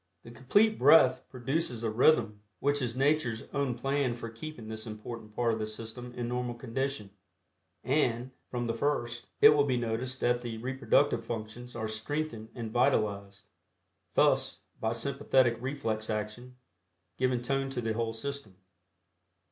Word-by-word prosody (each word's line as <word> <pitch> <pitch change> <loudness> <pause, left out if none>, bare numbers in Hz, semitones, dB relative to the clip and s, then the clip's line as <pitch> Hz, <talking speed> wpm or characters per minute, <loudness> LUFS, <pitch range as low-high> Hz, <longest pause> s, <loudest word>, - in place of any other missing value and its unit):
The 115 - -11
Complete 205 - +3
Breath 130 -3 +6
produces 130 -1 -2
a 110 - 0
rhythm 115 -3 +3 0.2
which 145 0 +1
is 120 -2 -2
Nature's 135 -5 +1
own 140 -3 0
plan 135 -1 0
for 115 -1 -7
keeping 115 0 -8
this 110 +1 -6
important 110 0 -8
part 120 -1 +2
of 110 - -2
the 110 - -2
system 115 +3 -7
in 120 -1 -3
normal 125 0 -2
condition, 120 -2 -3 0.7
and, 130 -3 +1 0.2
from 120 -1 -2
the 115 - -1
first, 120 -2 -1
it 145 - +11
will 150 -1 +5
be 130 -3 +1
noticed 120 +2 -2
that 120 0 +2
the 120 -2 -5
reproductive 130 0 +1
functions 115 +2 -6
are 110 -1 -2
strengthened 115 +1 -3
and 115 -3 -5
vitalized, 100 -5 +1 0.7
thus, - - +3 0.2
by 110 - 0
sympathetic 130 0 +2
reflex 115 -5 -2
action, 110 +4 -4 0.6
giving 125 -1 +1
tone 135 +1 0
to 135 -2 -3
the 115 -2 -1
whole 115 0 -1
system. 140 -3 -5
120 Hz, 150 wpm, -30 LUFS, 115-135 Hz, 0.7 s, it